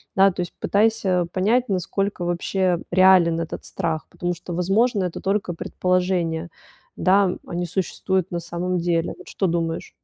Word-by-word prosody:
да, 195 0 +6
то 180 - -4
есть 175 - -5
пытайся 200 -4 +2
понять, 225 +7 +2
насколько 195 0 -1
вообще 175 +1 0
реален 180 -2 +5
этот 165 - -5
страх, 160 -1 -3
потому 175 0 -2
что, 175 +1 -8
возможно, 195 +4 +2
это 175 - -5
только 195 -2 -1
предположения, 180 -2 -1 0.5
да, 190 0 +3
а - - -6
не 175 0 -1
существуют 190 +1 -1
на 175 - -3
самом 175 +2 -3
деле, 170 -1 0
вот - - -14
что 190 - -1
думаешь? 165 -1 -2
180 Hz, 155 wpm, -23 LUFS, 170-195 Hz, 0.5 s, да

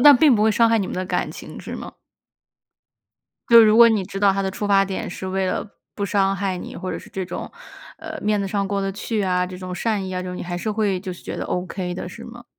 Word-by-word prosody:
那 290 +1 +10
并 275 0 +6
不 210 - +2
会 220 - +4
伤 230 +2 +4
害 225 0 +3
你 195 - -1
们 - - -5
的 185 - -2
感 - - -1
情， - - -9
是 - - -7
吗？ - - -7 1.6
就 230 -1 +9
如 215 +1 +5
果 235 0 +10
你 215 -4 +1
知 195 +1 -6
道 200 - +5
他 195 0 0
的 190 - -1
出 205 +2 -4
发 195 -1 +4
点， 190 -1 -4
是 190 - -6
为 190 0 -1
了 - - -2 0.3
不 205 - -2
伤 195 -1 +1
害 190 -2 -2
你， - - -8
或 185 0 -4
者 - - -4
是 - - -13
这 190 -1 -4
种， - - -6 0.5
呃， 315 -1 -7
面 210 0 +1
子 200 - -1
上 200 0 -1
过 200 0 -1
得 195 - -2
去 210 +1 -2
啊， 180 -1 +1
这 180 0 -8
种 185 -1 -6
善 205 0 -1
意 185 - -5
啊， 185 - -2
就 180 0 -5
你 - - -5
还 175 0 -4
是 215 - -2
会 205 -3 0
就 185 -1 -5
是 - - -15
觉 - - -5
得 - - -4
OK 180 0 -3
的， 180 - -5
是 230 +6 -9
吗？ 240 0 -11
195 Hz, 300 characters per minute, -22 LUFS, 185-215 Hz, 1.6 s, 那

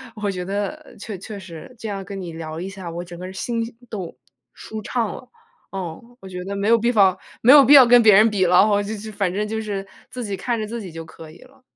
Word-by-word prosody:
我 210 -2 -2
觉 180 -2 -3
得 205 +8 -4
确 205 -1 -6
确 200 +2 -8
实， 175 +6 -11
这 225 - -6
样 195 -1 -4
跟 195 0 -7
你 170 -3 -7
聊 160 0 -6
一 185 - -5
下， 190 -3 -8
我 170 +1 -5
整 175 0 -10
个 185 +1 -7
心 230 +4 -2 0.3
都， 190 -6 -6 0.4
舒 220 0 -8
畅 225 0 -2
了。 255 - -12 0.4
嗯， 180 -4 -5 0.2
我 195 - -11
觉 180 -1 -6
得 195 +2 -5
没 200 +1 -2
有 230 +1 +6
必 235 +2 +1
方 195 -5 +4 0.2
没 250 +4 +7
有 290 -1 +9
必 270 +3 +6
要 270 -3 +10
跟 245 0 +7
别 215 -1 +7
人 215 +3 +6
比 195 -3 +1
了， 180 +1 +4
哦， 205 0 +3
就 210 - -5
就 215 +2 -8
反 195 -3 -1
正 210 +1 -1
就 220 +1 -3
是 200 -2 -4 0.2
自 250 - -7
己 200 -2 -3
看 235 +2 -2
着 215 - -3
自 230 +2 -5
己 190 -4 -8
就 165 0 -8
可 160 0 -13
以 165 - -16
了。 265 +1 -22
200 Hz, 280 characters per minute, -22 LUFS, 185-225 Hz, 0.4 s, 要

